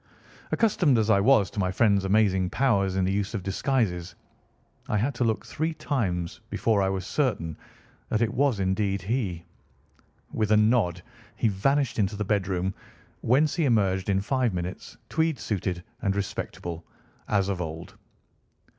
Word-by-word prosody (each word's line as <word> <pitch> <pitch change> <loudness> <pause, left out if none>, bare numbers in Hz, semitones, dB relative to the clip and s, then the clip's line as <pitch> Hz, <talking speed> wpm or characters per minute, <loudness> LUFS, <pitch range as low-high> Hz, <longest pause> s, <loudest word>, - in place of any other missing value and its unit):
Accustomed 175 - +3
as 110 0 +2
I 100 - +5
was 105 -4 +4
to - - -5
my 95 -2 +1
friend's 100 -1 +3
amazing 95 -2 +2
powers 100 -8 +1
in 95 -1 +1
the 95 - +1
use 100 +2 -1
of 100 - -3
disguises, 95 -3 -1 0.7
I 105 - +1
had 125 +7 0
to 125 - -1
look 110 -1 0
three 160 +1 -2
times 105 - -2
before 110 -3 +1
I 95 - +2
was 95 -1 -3
certain 100 - -1 0.5
that 110 - +1
it 115 0 -1
was 130 -4 +2
indeed 95 0 0
he. 95 -6 -2 0.9
With 110 -1 0
a - - +6
nod 105 -6 +2 0.3
he 115 - +1
vanished 135 +7 +1
into 100 0 +1
the 105 0 -3
bedroom, 95 -2 0 0.5
whence 140 +6 +3
he 165 - +2
emerged 100 -6 +2
in 95 0 +2
five 125 -1 0
minutes 90 +1 -6
tweed 160 -2 0
suited 90 -4 -3 0.2
and 100 -1 0
respectable, 85 -4 -4 0.4
as 100 -2 +1
of 95 -3 -2
old. 80 0 -6
100 Hz, 160 wpm, -26 LUFS, 95-120 Hz, 0.9 s, a